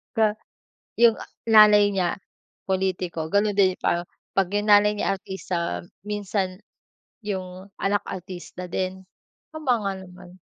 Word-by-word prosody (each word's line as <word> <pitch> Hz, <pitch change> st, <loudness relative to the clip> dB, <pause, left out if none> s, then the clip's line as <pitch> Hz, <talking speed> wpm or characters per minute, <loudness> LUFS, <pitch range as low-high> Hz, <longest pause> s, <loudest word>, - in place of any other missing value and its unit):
Ga 215 Hz, -1 st, +3 dB, 0.6 s
yung 235 Hz, -2 st, +6 dB, 0.3 s
nanay 210 Hz, -2 st, +7 dB
niya 180 Hz, +1 st, 0 dB, 0.5 s
pulitiko, 185 Hz, -4 st, -1 dB
ganun 205 Hz, 0 st, +2 dB
din. 185 Hz, -2 st, +5 dB
Pa 175 Hz, 0 st, 0 dB, 0.3 s
'pag 195 Hz, -2 st, +2 dB
yung 205 Hz, +1 st, +1 dB
nanay 205 Hz, 0 st, +6 dB
niya 195 Hz, -1 st, 0 dB
artista, 170 Hz, -, -4 dB, 0.2 s
minsan 200 Hz, -2 st, -2 dB, 0.7 s
yung 190 Hz, -1 st, -5 dB
anak 200 Hz, +1 st, +1 dB
artista 180 Hz, -1 st, -7 dB
din. 190 Hz, +1 st, -3 dB, 0.5 s
Tama 270 Hz, -7 st, 0 dB
nga 195 Hz, -1 st, -1 dB
naman. 180 Hz, -1 st, -13 dB
190 Hz, 120 wpm, -24 LUFS, 185-205 Hz, 0.7 s, nanay